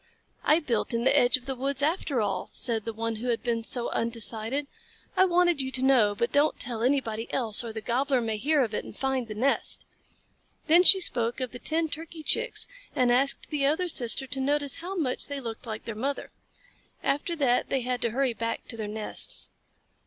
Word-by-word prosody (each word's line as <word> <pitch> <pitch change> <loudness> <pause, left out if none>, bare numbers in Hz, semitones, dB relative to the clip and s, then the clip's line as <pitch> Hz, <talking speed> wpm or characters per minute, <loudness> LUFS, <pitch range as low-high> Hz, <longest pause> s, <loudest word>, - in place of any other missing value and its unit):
"I 305 +2 +4
built 240 -6 -1
in 230 - 0
the 265 - +4
edge 245 +1 +5
of 250 - -14
the 270 - -2
woods 275 +2 -2
after 295 -5 0
all," 195 -3 -2
said 225 -4 0
the 230 - -2
one 225 0 -3
who 240 +3 -5
had 235 -2 -1
been 230 -2 -1
so 240 +1 +2
undecided. 230 +3 -1 0.5
"I 375 - +5
wanted 350 -4 +3
you 260 - -3
to 260 - 0
know, 240 -7 +4
but 235 - -1
don't 290 +2 +2
tell 235 -2 -3
anybody 235 -3 0
else, 235 -2 0
or 230 - -5
the 220 0 -6
Gobbler 260 +4 +1
may 225 -2 -2
hear 285 +5 +2
of 225 -3 -4
it - - -2
and - - -11
find 265 -3 -1
the 215 - -7
nest." 265 +6 0 0.8
Then 335 +3 +6
she 380 +1 +8
spoke 240 -8 +1
of 255 -2 -3
the 245 - -8
ten 320 +4 +1
Turkey 320 +1 -7
Chicks 475 +9 0 0.3
and 250 -1 +3
asked 270 +5 +2
the 285 -2 +1
other 320 +5 +1
sister 265 -4 +2
to 270 +1 -4
notice 285 +1 0
how 365 +4 -6
much 285 -8 -1
they 285 -1 -4
looked 230 -2 -7
like 220 -1 -6
their 230 - -4
mother. 270 +6 -3 0.7
After 290 +5 0
that 260 -6 +1
they 265 - 0
had 245 0 -2
to 235 - +1
hurry 255 +2 0
back 230 +1 -4
to 230 - -5
their 215 -2 -4
nests. 210 0 -1
255 Hz, 210 wpm, -27 LUFS, 230-285 Hz, 0.8 s, she